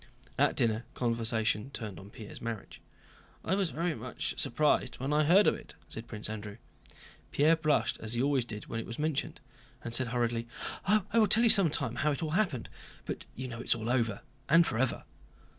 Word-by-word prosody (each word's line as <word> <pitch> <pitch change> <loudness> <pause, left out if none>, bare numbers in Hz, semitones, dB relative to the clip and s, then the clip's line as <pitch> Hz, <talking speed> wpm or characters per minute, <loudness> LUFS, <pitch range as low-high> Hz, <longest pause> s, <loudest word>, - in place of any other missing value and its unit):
At - - +3
dinner, 110 -1 +1
conversation 115 -1 0
turned 110 -9 -6
on 95 +1 -12
Pierre's 105 0 -10
marriage. 115 -3 -6 0.6
"I 185 - +1
was 195 -3 +1
very 170 +2 -1
much 125 -1 -4
surprised 150 +5 +1
when 135 +3 -2
I 150 0 +3
heard 190 +7 +6
of - - +5
it," - - -10
said 110 +1 -6
Prince 105 -1 -5
Andrew. 105 -1 -6 0.7
Pierre 155 +3 +4
blushed, 155 -3 +1
as 110 0 -4
he 120 - +1
always 140 -2 +2
did 105 -3 -7
when 115 - -4
it - - -6
was 115 - -6
mentioned, 150 -2 -2 0.4
and 115 - -5
said 130 +1 +2
hurriedly: 120 -1 -1 0.4
"I 210 +2 +4 0.2
will 215 - +5
tell 230 +3 +4
you 235 - +6
some 195 -5 +7
time 125 -5 -2
how 145 +2 +2
it 140 - -3
all 155 - -2
happened. 165 - 0 0.4
But - - -5
you 130 +1 -5
know 120 -2 -7
it - - -9
is - - +5
all 115 +1 -3
over, 115 -5 0 0.3
and 165 +3 +6
forever." 120 0 -1
125 Hz, 200 wpm, -31 LUFS, 115-155 Hz, 0.7 s, some